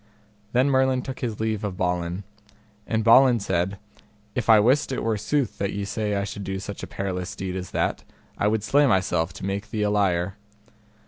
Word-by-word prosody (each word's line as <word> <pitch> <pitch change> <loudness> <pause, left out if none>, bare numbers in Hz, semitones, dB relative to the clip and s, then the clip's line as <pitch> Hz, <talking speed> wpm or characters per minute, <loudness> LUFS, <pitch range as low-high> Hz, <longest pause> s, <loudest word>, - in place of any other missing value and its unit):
Then 125 +3 +4
Merlin 130 -1 +2
took 130 - -6
his 115 -5 -3
leave 110 -1 -1
of 100 -3 -3
Balin. 90 +1 -1 0.6
And 110 -1 0
Balin 120 +2 +6
said, 95 0 -1 0.6
If 125 - -3
I 110 -1 +8
wist 130 +7 +3
it 130 - -2
were 115 -1 +1
sooth 115 +4 -1
that 100 -1 -1
ye 100 0 -3
say 105 0 -2
I 100 - 0
should 100 0 -6
do 95 0 -3
such 100 +1 -6
a - - -6
perilous 90 -2 -4
deed 95 -1 -4
as 90 -2 -5
that, - - -1 0.3
I 100 - 0
would 105 0 +1
slay 145 +5 +4
myself 90 -5 +1
to 95 - -7
make 100 +2 -3
thee 105 -1 -1
a 105 - +1
liar. 95 -2 +1
105 Hz, 200 wpm, -25 LUFS, 95-115 Hz, 0.6 s, I